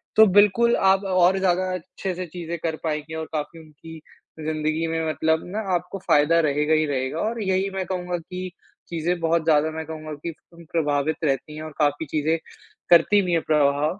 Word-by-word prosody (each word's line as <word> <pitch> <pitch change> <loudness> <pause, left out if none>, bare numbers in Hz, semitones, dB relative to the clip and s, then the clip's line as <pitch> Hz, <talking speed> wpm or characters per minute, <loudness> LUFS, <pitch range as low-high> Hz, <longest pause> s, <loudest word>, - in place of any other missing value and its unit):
तो 220 - +8
बिल्कुल 230 +4 +5
आप 190 +1 +3
और 185 0 +3
ज़्यादा 185 0 +1
अच्छे 185 +2 -5
से 185 +1 -4
चीज़ें 170 0 -6
कर 160 -1 -1
पाएँगे 155 0 -3
और 160 0 -4
काफ़ी 155 +2 -4
उनकी 160 +1 -12 0.5
ज़िंदगी 155 +1 -1
में 160 0 -1
मतलब 160 +1 +1
ना - - 0 0.2
आपको 180 +3 -4
फ़ायदा 150 +3 +4
रहेगा 150 +1 +1
ही 155 0 +3
रहेगा 135 +2 -2
और 225 +3 -2
यही 190 +1 0
मैं 190 -1 -2
कहूँगा 180 -1 -3
कि 180 +2 -7 0.4
चीज़ें 170 +1 -1
बहुत 165 0 +1
ज़्यादा 155 0 +3
मैं 160 0 -5
कहूँगा 155 -1 -7
कि 170 - -3 0.2
उम 170 0 -14
प्रभावित 150 -1 0
रहती 140 +1 -1
हैं 155 - -7
और 155 - -7
काफ़ी 145 +1 +1
चीज़ें 155 +2 0 0.5
करती 175 +4 +6
भी 180 -2 -1
है 165 - +3
प्रभाव 150 +4 +2
165 Hz, 190 wpm, -23 LUFS, 155-180 Hz, 0.5 s, तो